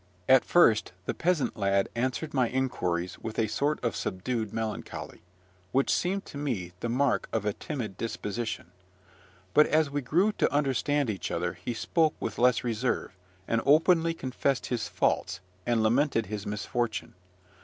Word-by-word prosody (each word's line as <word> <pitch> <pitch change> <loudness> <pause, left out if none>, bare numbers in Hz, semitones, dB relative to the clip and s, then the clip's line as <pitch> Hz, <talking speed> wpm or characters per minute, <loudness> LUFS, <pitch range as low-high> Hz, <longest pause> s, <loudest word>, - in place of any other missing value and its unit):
At 130 -1 +7
first 115 - +4
the - - -1
peasant 175 -4 0
lad 100 -2 +2
answered 130 +6 -2
my 130 -4 +2
inquiries 90 -9 -1
with 110 -1 -6
a 115 - +3
sort 140 +8 0
of 120 - 0
subdued 110 +3 -2
melancholy, 110 -1 -5 0.5
which 135 +1 +3
seemed 195 +3 0
to 140 - -8
me 110 -12 -2
the 120 - -3
mark 135 +3 +1
of 110 -2 -1
a 105 - +1
timid 110 -10 -5
disposition; 110 -4 -4 0.8
but, 150 - +6
as 155 -2 +2
we 145 0 -1
grew 175 - +2
to - - +1
understand 145 -2 +1
each 95 -5 -4
other, 85 0 -1
he 90 +8 -5
spoke 160 +6 +1
with - - -4
less 125 -1 +4
reserve, 120 -4 -1 0.3
and 115 0 +1
openly 165 +3 +4
confessed 130 -1 -1
his 120 -3 -2
faults, - - 0 0.3
and 115 -2 +2
lamented 120 +1 +2
his 105 +1 -5
misfortune. 110 +2 -2
120 Hz, 155 wpm, -28 LUFS, 110-145 Hz, 0.8 s, At